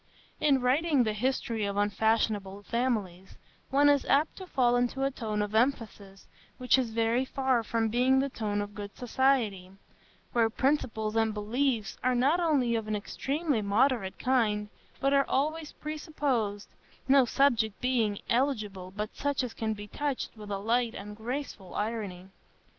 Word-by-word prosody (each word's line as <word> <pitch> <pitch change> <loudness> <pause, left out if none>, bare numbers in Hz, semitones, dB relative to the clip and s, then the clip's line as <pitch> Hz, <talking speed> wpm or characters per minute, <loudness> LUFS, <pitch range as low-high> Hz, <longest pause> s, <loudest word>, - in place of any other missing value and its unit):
In 280 -3 +3
writing 280 +2 +3
the 215 -2 -1
history 230 -1 -1
of 200 0 -2
unfashionable 205 -1 0
families, 205 -7 -2 0.3
one 285 +2 +4
is 285 -1 +4
apt 295 +3 +2
to 375 - -8
fall 245 -6 +2
into 245 +2 0
a 275 - +1
tone 215 -5 -2
of 205 0 -5
emphasis 220 -5 -1 0.3
which 255 +1 +3
is 250 -3 -1
very 230 +2 +1
far 265 -2 +1
from 225 0 0
being 250 +4 +3
the 270 +1 +2
tone 210 -5 -2
of 205 0 -9
good 205 -1 -8
society, 240 -7 +1 0.6
where 230 -2 +3
principles 225 -4 0
and 225 -1 +1
beliefs 225 +1 -1
are 255 0 +2
not 275 +8 +3
only 285 -8 +2
of 225 -2 -1
an 215 - -1
extremely 275 +5 -2
moderate 205 0 +1
kind, 215 -5 +1 0.3
but 275 +1 +2
are 275 -1 +3
always 305 +3 -1
presupposed, 285 -9 -2 0.4
no 270 0 +6
subjects 235 -4 +2
being 230 -5 0
eligible 215 -8 -1
but 210 +1 -4
such 285 -1 -1
as 245 - -4
can 220 -1 -2
be 205 0 -8
touched 285 +3 -3
with 210 -1 -10
a 200 - -2
light 230 +3 0
and 210 +1 -8
graceful 225 -4 -6
irony. 205 -4 -3
235 Hz, 160 wpm, -29 LUFS, 210-270 Hz, 0.6 s, no